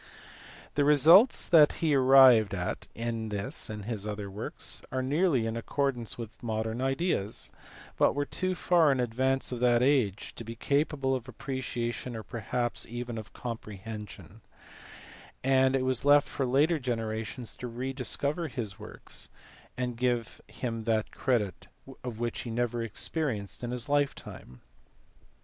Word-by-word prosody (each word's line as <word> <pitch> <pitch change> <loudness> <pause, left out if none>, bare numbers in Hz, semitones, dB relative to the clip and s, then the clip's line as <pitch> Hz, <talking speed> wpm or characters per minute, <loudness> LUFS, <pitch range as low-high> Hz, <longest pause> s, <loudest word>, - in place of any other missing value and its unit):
The 145 - +2
results 160 - +6
that 155 -3 +6
he 160 -3 0
arrived 130 -6 +7
at 90 -1 -3
in 115 -1 -3
this 100 -1 -3
and 105 -2 -6
his 105 -3 -4
other 105 -1 -5
works 105 +3 -4
are 130 0 -1
nearly 145 -2 +2
in 115 0 -2
accordance 125 0 -1
with 115 -1 -8
modern 110 +1 -2
ideas, 135 - -1 0.5
but - - +3
were 145 0 0
too 185 +4 -1
far 170 -4 +4
in 135 - +1
advance 130 +3 0
of 125 - -3
that 120 0 +4
age 125 -8 +1
to - - -5
be 115 +1 -7
capable 140 +1 0
of 130 -1 -3
appreciation 125 -2 -4
or 110 - -6
perhaps 120 +1 -3
even 120 0 -5
of 110 - -11
comprehension, 105 -3 -8 1.0
and 130 0 +4
it 130 -1 +1
was 130 -2 0
left 145 0 +5
for 135 - -2
later 150 +6 +3
generations 115 -1 -4
to 125 - -5
rediscover 135 +6 -2
his 115 -8 -5
works, - - -5 0.5
and 125 -2 -2
give 120 -1 -1
him 115 +1 -4
that 110 -1 0
credit 110 -9 -1 0.4
which 120 -1 -3
he 120 - -5
never 120 0 -1
experienced 115 - -3
in 120 - -2
his 125 -1 -1
lifetime. 140 - -2
120 Hz, 145 wpm, -29 LUFS, 110-135 Hz, 1.0 s, arrived